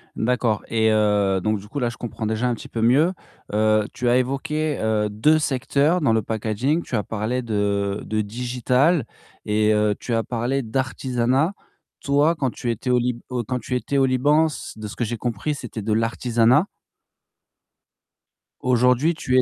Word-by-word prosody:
D'accord 115 -2 0
et, 110 -1 +2
heu, 105 -3 +2
donc 110 +1 0
du 105 - -13
coup 145 - -5
là, 120 -3 0
je 120 - -9
comprends 115 -1 -5
déjà 110 +3 0
un 120 - 0
petit - - -11
peu 115 - -3
mieux. 145 +10 +4 0.4
Heu, 110 0 +2
tu 125 -1 -1
as 125 - +4
évoqué, 150 +4 -1
heu, 110 -1 0
2 110 +10 +3
secteurs, 145 +4 +1
dans 125 -7 +3
le 110 - +2
packaging, 110 - -1
tu 125 - -4
as 105 - 0
parlé 110 +4 -2
de 100 -3 -1
de 110 0 -1
digital 125 +7 +1 0.4
et, 105 0 +2
heu, 105 -1 +2
tu 120 - -4
as 115 - +1
parlé 125 +4 -1
d'artisanat. 130 - 0 0.5
Toi, 145 +4 +2
quand 135 -5 -1
tu 120 - -3
étais 115 +3 -4
au 125 - +4
Lib 120 0 -1
au 125 -2 -2
quand 125 +2 -3
tu 125 +2 -4
étais 140 +3 -1
au 135 - +4
Liban, 145 +5 +3
s 155 - -7
de 110 -1 -6
ce 105 - -9
que - - -2
j'ai 115 +1 -3
compris, 120 +6 -2
c'était 120 -5 -7
de 110 +1 -1
l'artisanat? 115 - +2 1.9
Aujourd'hui 125 +5 +3
tu 130 -5 0
es - - +7
120 Hz, 185 wpm, -22 LUFS, 110-135 Hz, 1.9 s, es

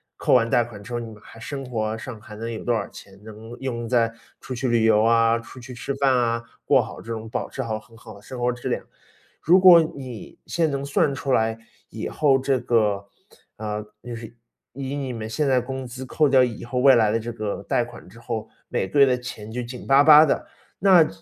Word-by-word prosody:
扣 - - +1
完 115 -2 +4
贷 120 +1 +3
款 110 -3 -11
之 120 +4 -9
后， 120 - -1
你 115 - -6
们 - - -11
还 115 - -14
生 135 +3 -6
活 110 -2 -2
上 110 -1 -8
还 105 -2 -11
能 115 +2 -5
有 110 - -6
多 120 - -1
少 110 - -2
钱， 95 -1 -14
能 110 +1 -11
用 120 -3 -4
在 115 -2 +2 0.3
出 130 - -6
去 125 +1 -2
旅 120 -2 +2
游 110 -1 +4
啊， 115 0 +3
出 120 +2 -12
去 125 +1 -10
吃 120 - -5
饭 135 -1 +2
啊， 115 -1 0 0.2
过 140 - +5
好 - - -9
这 115 - -8
种 110 -1 -5
保 - - -3
持 130 - -4
好 110 -2 -3
很 115 +1 -19
好 110 -1 -12
的 100 - -15
生 125 +4 -9
活 120 0 +1
质 120 0 -5
量。 - - -2 0.6
如 180 +4 +5
果 180 -3 +9
你 130 -6 -9
现 165 -1 0
在 - - -3
能 140 0 -3
算 140 0 +1
出 135 0 -3
来 110 -1 +2 0.3
以 - - -5
后 140 -3 +2
这 135 0 0
个， 105 -4 +1 0.5
呃， 105 0 -4 0.2
就 120 0 -6
是 115 0 -10 0.4
以 135 +1 -5
你 135 -3 -4
们 110 -2 -5
现 140 +7 -1
在 130 - +4
工 130 +1 -5
资 130 +2 -8
扣 150 +3 +2
掉 130 -1 +5
以 120 -3 -3
后 120 +2 -5
未 135 +1 +7
来 110 -2 +4
的 115 - +1
这 120 +1 -5
个 105 -3 -4
贷 120 - +2
款 120 0 -12
之 115 - -15
后， 115 -2 -4 0.2
每 95 - -2
个 140 - 0
月 140 - +9
的 125 -1 +2
钱 110 -3 -8
就 125 +2 -4
紧 120 +1 -9
巴 135 +1 +6
巴 150 +1 +9
的， 150 - -1 0.3
那 180 -5 +6
120 Hz, 260 characters per minute, -23 LUFS, 115-135 Hz, 0.6 s, 果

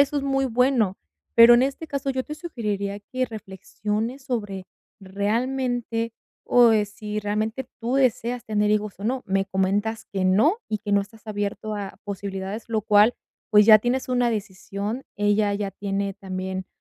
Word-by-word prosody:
eso 285 +1 +3
es 280 - 0
muy 270 -1 +1
bueno. 245 -5 +2 0.4
Pero, 230 +1 +10
en 245 - +5
este 275 +4 -2
caso, 280 -1 -3
yo 260 -1 -2
te 300 - -6
sugeriría 210 - -3
que 255 +5 -3
reflexiones 215 +3 -4
sobre 205 -8 -4 0.3
realmente, 230 +3 -1 0.3
o 240 -2 +6
eh, 210 -1 +3
si 210 0 -5
realmente 220 +5 -2
tú 235 +3 -1
deseas 245 -2 +1
tener 210 -1 +1
hijos 210 -2 -1
o 205 - -6
no, 255 +2 -1
me 195 0 +1
comentas 195 +4 -1
que 190 -1 -1
no, 225 - +4
y 215 - -1
que 205 0 -6
no 200 - +5
estás 215 +3 -11
abierto 205 +1 -3
a 200 -1 -6
posibilidades, 200 +1 -5
lo 220 -2 0
cual, 210 +2 +5 0.4
pues, 210 0 +7
ya 215 -1 +10
tienes 250 +4 -1
una 245 -1 +2
decisión, 205 +3 -4
ella 205 0 +2
ya 200 -1 -2
tiene 195 0 -3
también, 190 0 -5
215 Hz, 170 wpm, -24 LUFS, 200-245 Hz, 0.4 s, Pero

